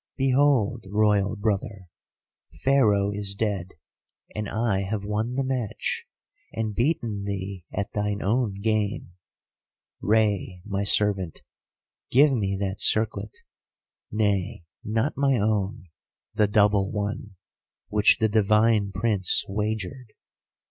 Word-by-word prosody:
'Behold, 130 -4 +2
Royal 105 0 +2
brother, 100 -1 -2 0.8
Pharaoh 105 -7 +3
is 100 -1 -3
dead, 100 -4 -2 0.6
and 105 -1 -4
I 110 -4 0
have 100 +1 -3
won 110 +4 -2
the 135 - 0
match, 130 -5 -3 0.5
and 110 -1 -3
beaten 115 -5 -1
thee 95 -2 -5
at 100 -1 -4
thine 105 -1 -1
own 105 -2 0
game. 105 -3 -1 0.9
Rei, 100 -4 +1
my 100 -1 -2
servant, 100 -4 +1 0.7
give 140 +3 +5
me 100 -5 -1
that 100 0 -3
circlet; 105 -1 +1 0.7
nay, 100 -5 0 0.2
not 110 +7 0
my 135 -2 +2
own, 100 -3 -1 0.5
the 105 - +3
double 100 -1 +3
one, 105 -1 -4 0.5
which 105 0 +4
the 110 - +2
divine 105 0 +3
Prince 95 -1 +1
wagered. 110 +4 -4
105 Hz, 110 wpm, -25 LUFS, 100-110 Hz, 0.9 s, give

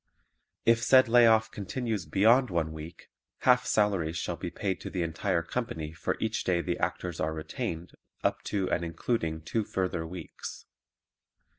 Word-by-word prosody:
If 115 0 +4
said 130 +2 +6
lay 120 0 +7
off 110 0 +4
continues 105 -1 -3
beyond 115 +6 +4
one 85 -3 0
week, 80 +2 -9 0.3
half - - +4
salaries 95 -6 +1
shall - - -2
be - - -5
paid 95 -3 -3
to - - -5
the 90 -3 -2
entire 85 0 -1
company 85 -7 -4
for 85 - -2
each 110 0 -1
day 90 -2 +1
the 85 - -2
Actors 90 -3 -2
are 80 0 -1
retained 80 +2 -4 0.3
up - - +1
to 95 -2 -1
and 85 - +1
including 80 -1 -2
two 110 +6 -1
further 90 -4 -2
weeks. 85 -2 -8
90 Hz, 160 wpm, -29 LUFS, 80-110 Hz, 0.3 s, lay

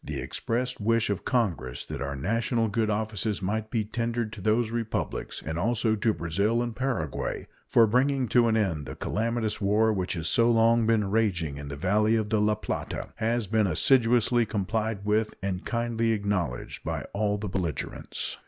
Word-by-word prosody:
The - - -4
expressed 125 0 -2
wish 115 0 +2
of 100 - -3
Congress 90 - -1
that - - -6
our 70 0 -3
national 115 - 0
good 110 +1 0
offices 105 -1 -1
might 110 +3 -2
be 115 -3 0
tendered 115 +1 -2
to 110 - -8
those 110 +3 +1
Republics, 115 -2 -3
and 80 +3 -3
also 110 +2 +1
to 110 +2 +1
Brazil 100 +8 0
and 120 -2 -4
Paraguay, 120 - -2 0.2
for 115 - +5
bringing 130 +3 +2
to 120 -2 +4
an 110 -1 +2
end 85 -9 -1
the - - -6
calamitous 115 0 -1
war 110 +2 +3
which 95 -2 -1
has 85 -2 -2
so 115 +7 +4
long 115 0 +4
been 105 -4 +2
raging 90 -10 0
in 70 0 -7
the 70 - -5
valley 105 +7 +2
of 110 -2 0
the 110 -2 +2
La 105 0 +3
Plata, 105 - -4
has 115 +1 0
been 110 +1 +2
assiduously 120 - +3
complied 110 0 -2
with 105 +1 +1
and 95 -2 -3
kindly 115 -1 0
acknowledged 95 - -2
by - - -3
all 105 0 0
the 105 +1 -4
belligerents. 90 -6 -3
110 Hz, 180 wpm, -27 LUFS, 100-115 Hz, 0.2 s, for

